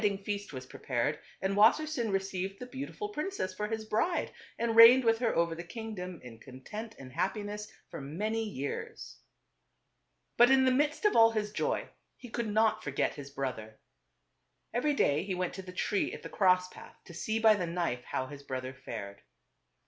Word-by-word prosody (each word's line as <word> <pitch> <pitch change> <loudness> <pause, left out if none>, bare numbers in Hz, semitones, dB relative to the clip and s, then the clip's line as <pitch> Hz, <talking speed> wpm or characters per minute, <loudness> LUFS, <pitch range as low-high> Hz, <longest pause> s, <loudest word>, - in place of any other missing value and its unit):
jj. - - -5
ding 200 -2 +2
f 195 - -20
ea 205 - +1
st 205 - -12
was 130 -2 -7
prepared 130 +3 -2 0.2
and 195 +1 +1
Wassersein 235 +2 +3
received 195 0 -2
the 250 - -6
beautiful 280 - -6
princess 340 - -3
for 210 +3 -3
his 220 0 -3
bride, 225 +12 0 0.3
and 230 -1 0
reigned 235 +3 +10
with 225 -1 +3
her 240 -2 +1
over 170 0 +2
the 170 +1 -6
kingdom 185 -3 -6
in 115 -2 -11
content 210 - -8
and 130 -1 -11
happiness 210 +4 -3 0.2
for - - -6
many 210 +11 -2
years. 215 - -5 1.2
But 240 +1 +7
in 265 0 +5
the 260 - +4
midst 295 +8 +1
of 420 - +4
all 225 0 +8
his 210 -1 -1
joy, - - -1 0.3
he 245 - -11
could 235 0 -2
not 220 +1 +2
forget 140 -1 0
his 140 -1 -9
brother. 125 -6 -5 1.0
Every 285 +5 +1
day 145 - +3
he 190 -1 -3
went 180 -1 -2
to 190 - -6
the 185 -1 -9
tree 195 +2 0
at - - -8
the - - -7
cross 185 -2 +3
path - - -13
to 170 - -11
see 220 +6 -2
by 220 -1 +6
the 185 -5 -2
knife 165 -8 -2
how 130 - -2
his 140 +1 -10
brother 130 -2 -5
fared. 110 -6 -7
TWO - - -25
BROTHERS. - - -45
205 Hz, 200 wpm, -31 LUFS, 150-225 Hz, 1.2 s, reigned